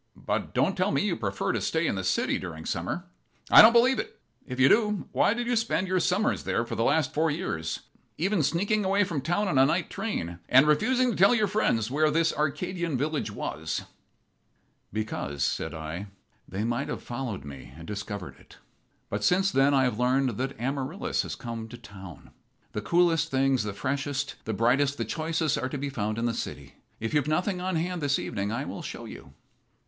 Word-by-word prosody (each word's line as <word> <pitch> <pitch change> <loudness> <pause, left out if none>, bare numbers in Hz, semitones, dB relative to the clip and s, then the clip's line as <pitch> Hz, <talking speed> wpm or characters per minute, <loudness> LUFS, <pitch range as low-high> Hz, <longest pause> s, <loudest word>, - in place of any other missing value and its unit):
But - - -3
don't - - +2
tell - - +1
me - - +1
you - - 0
prefer - - -2
to - - -1
stay - - 0
in - - +1
the - - -3
city - - +1
during - - -7
summer. - - -3 0.5
I - - +11
don't 220 - +9
believe 245 +3 +4
it. - - -6 0.3
If 125 0 -5
you 130 - +7
do, 210 0 +2
why 205 - +3
did 240 0 -2
you 245 +1 +1
spend 225 -4 0
your 185 0 +1
summers 180 +5 +1
there 115 - 0
for - - -6
the 115 - 0
last 155 +3 +2
four 160 +2 +2
years, 80 - -3 0.4
even 190 +2 +1
sneaking 200 +8 +1
away 195 +2 +3
from 170 -7 -2
town 175 +8 0
on 140 -8 +2
a 135 - +7
night 165 +2 0
train, 85 - -3
and 130 +3 +7
refusing 245 - +3
to - - -3
tell 200 +6 +5
your 215 -2 +3
friends 125 - +1
where 155 +2 +3
this 160 +1 +2
Arcadian 160 +1 -1
village 150 -2 -1
was?" 80 -6 -4 1.1
"Because," 70 -10 -3
said 80 +4 -1
I, 80 +5 -5 0.4
"they 100 +3 -3
might 120 +1 -1
have - - -4
followed 120 - -5
me 70 -3 -10
and 80 - -10
discovered 100 -2 -6
it. - - -18 0.5
But - - -3
since 190 +2 +3
then 140 -2 +4
I 135 - +4
have 125 -3 0
learned 130 +1 +2
that 130 -1 -3
Amaryllis 135 +2 -1
has - - -5
come 115 -1 -6
to 120 +2 -10
town. 95 -7 -12 0.4
The 105 - -3
coolest 170 +5 +2
things, 135 -1 +2
the 105 0 -3
freshest, 140 +6 -2
the 110 - -2
brightest, 135 +6 +2
the - - -2
choicest, 160 -1 -1
are 130 - -2
to 145 - -4
be 140 +1 -3
found 110 -4 -2
in 115 - -1
the 120 - +1
city. - - -6 0.3
If 115 - -3
you've 150 -2 +2
nothing 180 +4 0
on 185 0 -1
hand 175 +1 -1
this 140 -1 +2
evening 100 -2 -3
I 125 +5 -2
will - - -6
show - - -7
you." 65 - -11
140 Hz, 205 wpm, -27 LUFS, 115-180 Hz, 1.1 s, I